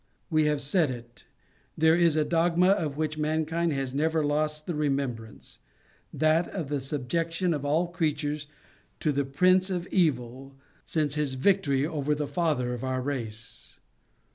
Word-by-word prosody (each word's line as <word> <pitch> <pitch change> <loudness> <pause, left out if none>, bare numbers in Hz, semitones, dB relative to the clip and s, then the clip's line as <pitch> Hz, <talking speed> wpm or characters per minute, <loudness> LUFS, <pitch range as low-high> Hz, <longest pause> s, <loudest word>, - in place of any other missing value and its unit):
We 155 -1 +3
have 150 -1 +1
said 155 +1 +2
it; 120 -1 -9 0.5
there 160 +1 +5
is 170 -2 +3
a 155 -1 +2
dosfma 170 +2 +3
of 150 -7 -2
which 155 0 -2
mankind 160 +2 0
has 135 -2 -3
never 160 +2 +1
O - - +1
lost 150 +1 -1
the 175 - -3
remembrance; 135 -7 -3 0.5
that 155 +3 +2
of 165 -8 -5
the 145 -2 -1
subjection 165 +6 -1
of 145 -2 -3
all 155 +5 +2
creatures 150 -3 -2 0.5
to 155 - +1
the 140 0 0
prince 185 +7 +3
of 180 -2 -2
evil 135 -5 0 0.3
sinc*e 150 -3 0
his 140 -3 -1
victory 145 -3 +2
over 150 -2 -1
the 150 0 -2
father 145 -5 0
of 120 - -6
our 130 0 -1
race. 115 -5 -5
150 Hz, 160 wpm, -27 LUFS, 135-165 Hz, 0.5 s, there